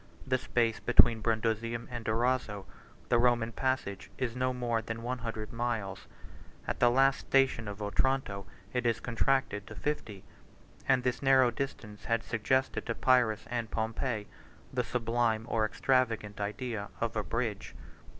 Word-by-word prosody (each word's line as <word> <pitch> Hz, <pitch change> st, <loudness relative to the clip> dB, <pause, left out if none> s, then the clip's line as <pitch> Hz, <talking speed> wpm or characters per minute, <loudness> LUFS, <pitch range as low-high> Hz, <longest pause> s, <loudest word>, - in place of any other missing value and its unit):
The 130 Hz, -1 st, +1 dB
space 115 Hz, -3 st, +1 dB
between 115 Hz, -2 st, +5 dB
Brundusium 115 Hz, +1 st, -1 dB
and 120 Hz, -2 st, -5 dB
Durazzo, 110 Hz, -3 st, 0 dB, 0.4 s
the 120 Hz, -, +4 dB
Roman 120 Hz, -1 st, +3 dB
passage, 130 Hz, -7 st, -2 dB
is 125 Hz, -3 st, -2 dB
no 130 Hz, 0 st, +1 dB
more 120 Hz, -2 st, -1 dB
than 115 Hz, 0 st, -5 dB
one 125 Hz, +1 st, -2 dB
hundred 115 Hz, -2 st, -5 dB
miles; 115 Hz, -5 st, -3 dB, 0.5 s
65 -, -, -8 dB
at -, -, -2 dB
the 120 Hz, -, +6 dB
last 135 Hz, +2 st, +4 dB
station 135 Hz, -4 st, +2 dB
of 105 Hz, 0 st, -5 dB
Otranto, 105 Hz, -2 st, 0 dB, 0.3 s
it 125 Hz, -1 st, +1 dB
is 115 Hz, -1 st, +1 dB
contracted 115 Hz, -3 st, 0 dB
to -, -, -9 dB
fifty; 115 Hz, -10 st, -3 dB, 0.5 s
66 -, -, -24 dB
and 130 Hz, -1 st, +4 dB
this 125 Hz, -1 st, 0 dB
narrow 130 Hz, -2 st, +5 dB
distance 115 Hz, -5 st, -5 dB
had 115 Hz, -1 st, +1 dB
suggested 130 Hz, +3 st, 0 dB
to 115 Hz, -, -1 dB
Pyrrhus 125 Hz, -5 st, +3 dB
and 120 Hz, -2 st, -2 dB
Pompey 110 Hz, 0 st, -2 dB, 0.5 s
the 125 Hz, -1 st, +1 dB
sublime 115 Hz, -2 st, 0 dB
or 110 Hz, -2 st, +1 dB
extravagant 115 Hz, -4 st, 0 dB
idea 105 Hz, 0 st, -3 dB
of 115 Hz, -1 st, -2 dB
a 110 Hz, -, +1 dB
bridge. 115 Hz, -2 st, -3 dB
115 Hz, 155 wpm, -31 LUFS, 110-125 Hz, 0.5 s, the